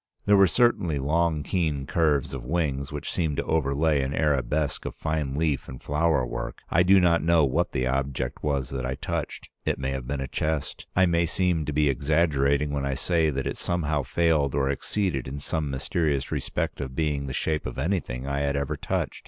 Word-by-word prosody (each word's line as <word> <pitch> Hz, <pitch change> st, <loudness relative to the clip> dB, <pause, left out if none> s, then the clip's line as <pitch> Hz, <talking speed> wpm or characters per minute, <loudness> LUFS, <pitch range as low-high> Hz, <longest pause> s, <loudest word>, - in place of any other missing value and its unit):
There 105 Hz, -, +5 dB
were 100 Hz, -1 st, +7 dB
certainly 90 Hz, -, +2 dB
long 80 Hz, +2 st, +1 dB
keen 75 Hz, -6 st, -1 dB
curves 75 Hz, -3 st, +1 dB
of 65 Hz, -3 st, -5 dB
wings 70 Hz, -1 st, -1 dB
which 75 Hz, -1 st, -4 dB
seemed 80 Hz, -4 st, -1 dB
to -, -, 0 dB
overlay 75 Hz, 0 st, +1 dB
an 70 Hz, +2 st, -2 dB
arabesque 75 Hz, 0 st, 0 dB
of -, -, -5 dB
fine 75 Hz, -3 st, -2 dB
leaf 75 Hz, -2 st, 0 dB
and 65 Hz, -1 st, -8 dB
flower 75 Hz, -3 st, +1 dB
work. -, -, -5 dB
I 85 Hz, -, +4 dB
do 95 Hz, +2 st, +6 dB
not 85 Hz, -2 st, +3 dB
know 85 Hz, -2 st, +4 dB
what 65 Hz, -, 0 dB
the 65 Hz, -, 0 dB
object 65 Hz, -1 st, -2 dB
was 70 Hz, -4 st, -1 dB
that 65 Hz, -2 st, -3 dB
I 65 Hz, +1 st, -2 dB
touched. -, -, -4 dB
It -, -, 0 dB
may 65 Hz, +1 st, -2 dB
have 65 Hz, -2 st, -4 dB
been 70 Hz, +1 st, -2 dB
a 65 Hz, -, -3 dB
chest. 75 Hz, 0 st, -3 dB
I 95 Hz, -, +5 dB
may 85 Hz, -1 st, +2 dB
seem 85 Hz, -2 st, 0 dB
to 75 Hz, -, -2 dB
be 75 Hz, 0 st, +2 dB
exaggerating 70 Hz, 0 st, +2 dB
when 70 Hz, -1 st, -2 dB
I 70 Hz, -1 st, -1 dB
say 80 Hz, +2 st, +1 dB
that 65 Hz, -2 st, -2 dB
it -, -, -3 dB
somehow 80 Hz, -4 st, 0 dB
failed 75 Hz, +1 st, +1 dB
or 70 Hz, -1 st, +2 dB
exceeded 85 Hz, -2 st, -2 dB
in 70 Hz, +2 st, -5 dB
some 75 Hz, +1 st, -2 dB
mysterious 70 Hz, +1 st, -1 dB
respect -, -, -2 dB
of 65 Hz, -2 st, -5 dB
being 75 Hz, -3 st, -1 dB
the -, -, -4 dB
shape 80 Hz, +3 st, -1 dB
of -, -, -7 dB
anything 65 Hz, -5 st, -2 dB
I 70 Hz, 0 st, -1 dB
had 70 Hz, 0 st, 0 dB
ever 70 Hz, -1 st, -1 dB
touched. -, -, -2 dB
75 Hz, 205 wpm, -26 LUFS, 70-80 Hz, -, were